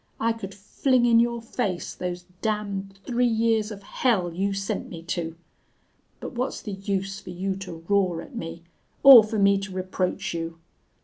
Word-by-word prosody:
I 230 Hz, 0 st, +2 dB
could 195 Hz, -4 st, -8 dB
fling 245 Hz, +5 st, +1 dB
in 230 Hz, -1 st, +5 dB
your 235 Hz, 0 st, +1 dB
face 205 Hz, -6 st, -3 dB
those 180 Hz, 0 st, -5 dB, 0.2 s
damned 200 Hz, -3 st, -2 dB
three 245 Hz, 0 st, +2 dB
years 225 Hz, -2 st, +2 dB
of 200 Hz, -2 st, -9 dB
hell 195 Hz, -6 st, 0 dB
you 195 Hz, +3 st, 0 dB
sent 195 Hz, 0 st, -3 dB
me 165 Hz, -2 st, -8 dB
to! 165 Hz, -1 st, -3 dB, 0.8 s
But -, -, -6 dB
what's 250 Hz, +2 st, -2 dB
the 210 Hz, -, -5 dB
use 195 Hz, 0 st, -3 dB
for 190 Hz, -, -12 dB
you 190 Hz, +2 st, -2 dB
to 170 Hz, -4 st, -8 dB
roar 190 Hz, -4 st, +2 dB
at 275 Hz, -, -13 dB
me 165 Hz, -5 st, -6 dB, 0.4 s
or 265 Hz, -5 st, +11 dB
for 215 Hz, +1 st, -3 dB
me 200 Hz, -1 st, +4 dB
to 195 Hz, 0 st, -6 dB
reproach 185 Hz, -1 st, -2 dB
you? 165 Hz, 0 st, -4 dB
195 Hz, 175 wpm, -25 LUFS, 180-225 Hz, 0.8 s, or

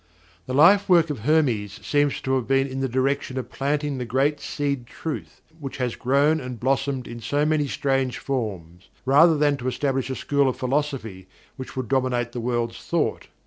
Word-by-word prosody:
The 130 Hz, -, -2 dB
lifework 175 Hz, 0 st, +5 dB
of 140 Hz, -, -4 dB
Hermes 120 Hz, -7 st, +1 dB
seems 145 Hz, -1 st, +1 dB
to 130 Hz, -, -1 dB
have 130 Hz, -3 st, 0 dB
been 135 Hz, 0 st, +3 dB
in 135 Hz, -1 st, -5 dB
the 135 Hz, 0 st, -1 dB
direction 130 Hz, +1 st, -1 dB
of 130 Hz, -, -5 dB
planting 145 Hz, 0 st, -1 dB
the -, -, -2 dB
great 135 Hz, +5 st, +1 dB
Seed 140 Hz, -5 st, -3 dB
Truth 160 Hz, +5 st, -7 dB, 0.2 s
which 135 Hz, -3 st, -6 dB
has 125 Hz, -3 st, -2 dB
grown 145 Hz, +5 st, +2 dB
and 125 Hz, -2 st, -7 dB
blossomed 135 Hz, +1 st, 0 dB
in 120 Hz, 0 st, -7 dB
so 145 Hz, +6 st, 0 dB
many 155 Hz, -2 st, +1 dB
strange 135 Hz, -2 st, 0 dB
forms, 95 Hz, -11 st, -5 dB, 0.2 s
rather 150 Hz, +5 st, +6 dB
than 145 Hz, -1 st, +2 dB
to 125 Hz, -1 st, -5 dB
establish 135 Hz, 0 st, -1 dB
a 130 Hz, -, -2 dB
school 140 Hz, 0 st, +1 dB
of 130 Hz, -, -4 dB
philosophy 130 Hz, -8 st, -2 dB, 0.3 s
which 130 Hz, -, -8 dB
would 130 Hz, -2 st, -3 dB
dominate, 125 Hz, -2 st, 0 dB
the 120 Hz, -, -5 dB
world's 120 Hz, -1 st, -2 dB
thought. -, -, -1 dB
135 Hz, 185 wpm, -24 LUFS, 125-145 Hz, 0.3 s, rather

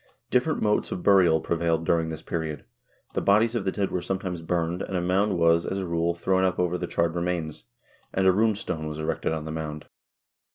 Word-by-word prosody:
Different 130 Hz, +5 st, +1 dB
modes 105 Hz, -1 st, +1 dB
of 90 Hz, -, -4 dB
burial 90 Hz, -5 st, +5 dB
prevailed 85 Hz, -1 st, 0 dB
during 80 Hz, 0 st, +1 dB
this 80 Hz, -1 st, -6 dB
period. 80 Hz, -3 st, -4 dB, 0.5 s
The -, -, 0 dB
bodies 110 Hz, +3 st, +3 dB
of 115 Hz, -5 st, -2 dB
the 95 Hz, -, +1 dB
dead 100 Hz, -1 st, -2 dB
were 90 Hz, -, -1 dB
sometimes 95 Hz, -2 st, -3 dB
burned, 85 Hz, +1 st, -1 dB
and 95 Hz, -, -3 dB
a -, -, +1 dB
mound 95 Hz, +2 st, +1 dB
was, 85 Hz, 0 st, +4 dB
as 95 Hz, -, -3 dB
a 95 Hz, -, -2 dB
rule, 85 Hz, 0 st, 0 dB
thrown 95 Hz, +2 st, +1 dB
up 95 Hz, -1 st, +1 dB
over 90 Hz, -1 st, +1 dB
the 90 Hz, 0 st, -3 dB
charred 85 Hz, -1 st, 0 dB
remains, 85 Hz, -4 st, -3 dB, 0.5 s
and 95 Hz, -, 0 dB
a 95 Hz, -, +7 dB
rune 110 Hz, +3 st, +2 dB
stone 80 Hz, -6 st, -4 dB
was 75 Hz, 0 st, -5 dB
erected 80 Hz, 0 st, -2 dB
on 80 Hz, -1 st, -3 dB
the 80 Hz, -, -5 dB
mound. 75 Hz, -1 st, -5 dB
85 Hz, 215 wpm, -26 LUFS, 80-95 Hz, 0.5 s, a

